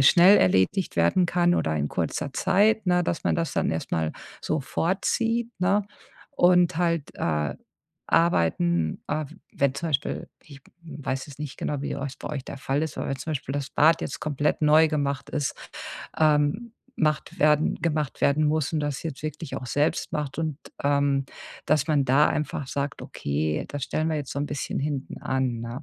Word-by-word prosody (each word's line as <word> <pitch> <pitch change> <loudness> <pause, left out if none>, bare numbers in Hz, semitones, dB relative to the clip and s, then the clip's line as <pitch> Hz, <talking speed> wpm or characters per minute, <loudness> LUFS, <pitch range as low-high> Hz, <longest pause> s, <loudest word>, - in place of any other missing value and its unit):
schnell 175 +8 +7
erledigt 95 - +2
werden 85 - +3
kann 175 0 +2
oder 80 - 0
in 75 -1 -1
kurzer 130 - -2
Zeit, 200 +6 +3
ne, 180 0 +3
dass 165 - -2
man - - +2
das 165 -1 -1
dann - - +1
erst 80 - -4
mal 80 -1 0 0.3
so 155 - 0
vorzieht.“, 225 - 0
ne? 195 +3 +2 0.4
Und 180 -1 +4
halt, 165 -3 0
äh, 75 -3 -1 0.5
Arbeiten 85 - +2
äh, 155 +1 -1
w - - -15 0.2
wenn 140 -1 +1
zum 165 - -3
Beispiel 145 -2 -2
ich 140 -3 -14 0.2
weiß 140 -5 -4
jetzt 145 -2 -12
nicht 150 -3 -5
genau, 145 -2 -2
wie - - -3
ihr - - -3
euch 140 -1 -5
bei - - -6
euch 140 -3 -4
der - - -7
Fall 135 +2 -1
ist, 160 - -3
aber - - -3
wenn 135 - -1
zum 160 - -6
Beispiel 135 -2 -4
das 140 -2 -3
Bad 160 +3 +4
jetzt 140 - -5
komplett 145 -1 0
neu 155 +2 +6
gemacht 140 -3 -2
ist, 145 -3 -1 0.6
ähm 155 +9 +2 0.3
macht 155 -2 0
werden 150 0 +4
gemacht 155 -4 -2
werden 150 +2 +3
muss 150 -1 0
und 155 - 0
das 145 -2 -3
jetzt 155 -4 -6
wirklich 155 -1 -5
auch 130 - -6
selbst 145 +4 0
macht, 150 -2 -3
und, 155 -3 -1 0.3
ähm, 140 -1 +2 0.4
dass 150 -1 +2
man 145 -3 +3
da 135 +4 +5
einfach 145 -2 -2
sagt: 140 +1 -3
„Okay, 75 +2 -2
das 145 -1 -5
stellen 155 +1 -1
wir 160 - 0
jetzt 145 -3 -4
so - - -3
'n 145 - -1
bisschen 145 -1 -3
hinten 140 -1 -3
an, 130 -3 -1
ne?“ 120 +4 -6
145 Hz, 190 wpm, -26 LUFS, 135-160 Hz, 0.6 s, schnell